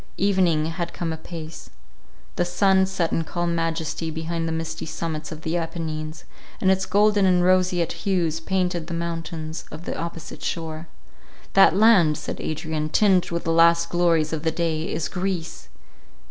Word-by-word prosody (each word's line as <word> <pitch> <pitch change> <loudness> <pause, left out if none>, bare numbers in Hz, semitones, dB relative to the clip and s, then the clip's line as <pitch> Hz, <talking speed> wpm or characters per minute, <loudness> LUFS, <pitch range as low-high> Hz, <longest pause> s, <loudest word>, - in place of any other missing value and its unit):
Evening 185 -6 +2
had 165 +1 -4
come 165 -2 -2
apace. 160 0 -8 0.7
The - - +1
sun 190 +2 +3
set 180 -3 -1
in 165 - 0
calm 175 +2 -2
majesty 165 -1 -2
behind 165 +1 -3
the - - -2
misty 165 0 -4
summits 160 -1 -4
of 155 0 -8
the 165 +2 -1
Apennines, 160 -2 -4 0.4
and 190 - +3
its 190 0 0
golden 205 0 +4
and 180 -1 +4
roseate 180 -2 +2
hues 175 -5 -1
painted 180 -1 -1
the 170 - -4
mountains 165 -1 -4
of 155 +3 -9
the - - -3
opposite 165 -1 -6
shore. 160 -1 -4 0.7
"That 195 -3 +6
land," 195 -8 +5
said - - -6
Adrian, 155 0 -3
"tinged 190 +1 +3
with 170 0 -3
the 165 - 0
last 170 0 +5
glories 165 -3 +2
of 155 - -2
the 160 - +1
day, 160 -1 -2
is 160 +1 -2
Greece." 180 - -4
165 Hz, 160 wpm, -24 LUFS, 160-180 Hz, 0.7 s, That